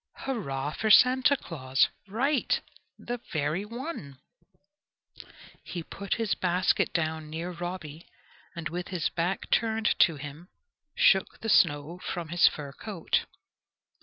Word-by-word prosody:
"Hurrah 145 - -3
for 220 - -2
Santa 255 +5 +6
Claus!" 135 - +1 0.2
Right! 260 +7 +1 0.4
the 245 0 -5
very 155 +3 -1
one. 230 - -7 1.5
He 175 -2 -6
put 200 +4 -3
his 225 -2 0
basket 180 +1 +1
down 160 -2 -2
near 165 +3 -4
Robby, 175 -3 -6 0.5
and 170 -2 -4
with 175 +2 -4
his 180 -4 -1
back 175 +3 -2
turned 220 -1 +2
to 165 - +5
him 145 +5 -9 0.5
shook 190 -1 +3
the 225 - -3
snow 145 0 +3
from 175 -3 -5
his 175 +1 +5
fur 145 -2 -3
coat. 190 +4 -2
175 Hz, 125 wpm, -28 LUFS, 155-215 Hz, 1.5 s, Santa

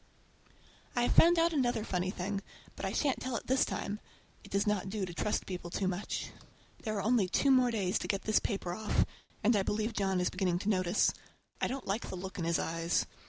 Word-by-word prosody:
I 240 - +2
have - - +2
found 340 +1 +7
out 335 0 +3
another 245 -6 +1
funny 185 -3 -1
thing, 195 +1 -3 0.3
but - - -5
I - - -2
shan't 280 -4 0
tell 255 -1 -2
it - - -3
this 260 +1 +3
time! 205 +1 -3 0.4
It - - -13
does 200 +1 +1
not 205 -2 0
do 200 -1 -2
to 175 - -7
trust 210 +4 -1
people 180 -2 -5
too 190 +2 -1
much. 185 +2 -3 0.5
There 215 -2 -2
are 200 - -1
only 220 -3 +3
two 275 +8 +3
more 255 -2 +5
days 200 -5 0
to - - -4
get 195 -1 -1
this 215 - +3
paper 195 -5 -2
off, 215 +2 +1 0.4
and 225 +2 +5
I 200 - +3
believe 215 +3 -1
John 195 -3 +1
is 180 - +1
beginning 185 -2 +1
to 205 - -1
notice. 185 -1 +3 0.5
I - - +2
don't 270 0 -4
like 200 +4 -2
the - - -4
look 190 +1 -6
in 170 - -1
his 170 0 +2
eyes. 165 +1 0
200 Hz, 225 wpm, -32 LUFS, 185-230 Hz, 0.5 s, found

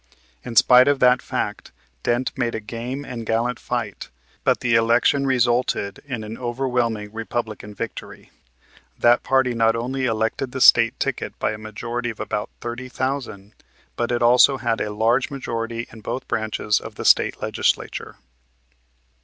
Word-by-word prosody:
In 120 - -7
spite 125 +3 +7
of 145 -1 +3
that 125 0 +5
fact - - -4 0.3
Dent 120 +2 -1
made 120 -3 -1
a - - -2
game 120 +6 -6
and 120 -3 -6
gallant 115 +2 -1
fight; 120 -5 -4 0.3
but - - +2
the 120 -1 +1
election 120 +5 +3
resulted 120 -5 +1
in 125 -6 -5
an 110 +2 -7
overwhelming 120 -4 -2
Republican 110 -2 -5
victory. 115 0 -7 0.7
That 120 +1 +4
party 130 -2 +2
not 115 -1 +2
only 130 +3 -2
elected 115 +3 -1
the 130 - -3
State 115 -2 +6
ticket - - -3
by - - 0
a 105 - -6
majority 120 +3 -4
of 110 - -8
about 105 - -3
30,000 125 -3 -4 0.4
but 120 0 -1
it 120 0 0
also 125 +3 +6
had 115 -3 -1
a 105 - -1
large 115 +6 +1
majority 115 -4 -4
in 110 - -12
both 130 - -5
branches 110 -1 0
of - - -10
the - - -6
State - - +4
Legislature. - - -2
120 Hz, 155 wpm, -22 LUFS, 115-125 Hz, 0.7 s, spite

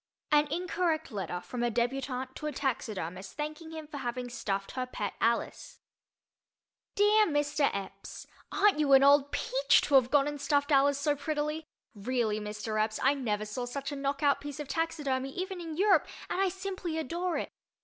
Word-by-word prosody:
An 295 0 +5
Incorrect 330 0 -1
Letter 180 -4 -4
from 245 +4 -5
a 240 - +2
Débutante 255 +2 -2
to 300 - -5
a - - -1
Taxidermist 205 - -3
Thanking 305 +2 -5
Him 320 -1 -7
for 300 -1 -8
Having 245 0 -3
Stuffed 195 -5 -3
Her 255 -1 -3
Pet 210 -5 -4
Alice 230 0 -1 1.2
DEAR 420 +1 +5
MR. 290 -2 +1
Epps: 195 0 -7 0.3
Aren't 400 -5 +3
you 285 -2 +4
an 270 0 +8
old 285 0 +5
peach - - +3
to 290 - -3
have 260 -3 +6
gone 285 0 +4
and 295 -1 -4
stuffed 285 0 +1
Alice 280 0 +4
so 290 +1 +1
prettily! 300 +1 -2 0.3
Really, 220 0 -1
Mr. 215 +1 -2
Epps, 215 0 -3
I 270 - +5
never 215 -7 -2
saw 230 +4 -4
such 275 +4 -4
a - - -4
knockout 280 +1 +1
piece 290 0 -7
of 295 - -5
taxidermy, 275 -5 -1
even 370 0 -4
in 325 -2 -6
Europe, 385 -4 +4 0.2
and 375 - 0
I 390 - +3
simply 370 -3 -4
adore 340 +4 -2
it. - - -3
280 Hz, 180 wpm, -30 LUFS, 245-315 Hz, 1.2 s, an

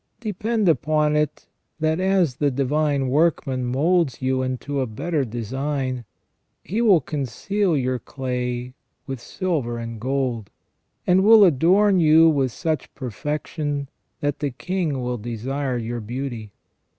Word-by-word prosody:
Depend 215 0 -1
upon 155 -2 +2
it 150 -1 -1 0.3
that, 160 +1 +1
as 185 -8 +2
the 145 - +2
Divine 140 +1 0
Workman 135 -3 +1
moulds 145 +2 +1
you 130 0 0
into 130 +2 -2
a 130 - -1
better 145 +7 -1
design, 130 +2 -3 0.6
He 215 +6 -2
will 200 -8 +5
conceal 160 - -1
your 130 -1 -1
clay 125 -2 -4 0.3
with 135 -3 -5
silver 150 -12 -2
and 115 -2 -6
gold, 125 -4 -1 0.6
and 185 +1 +4
will 215 0 +8
adorn 185 +5 +4
you 160 0 +6
with 135 -4 +1
such 160 +4 -3
perfection 145 +3 -3 0.3
that 145 -1 -1
the 145 - -1
King 155 -1 -2
will 125 -1 -2
desire 125 +4 -3
your 120 +1 -3
beauty. 120 -1 -5
140 Hz, 130 wpm, -23 LUFS, 125-165 Hz, 0.6 s, will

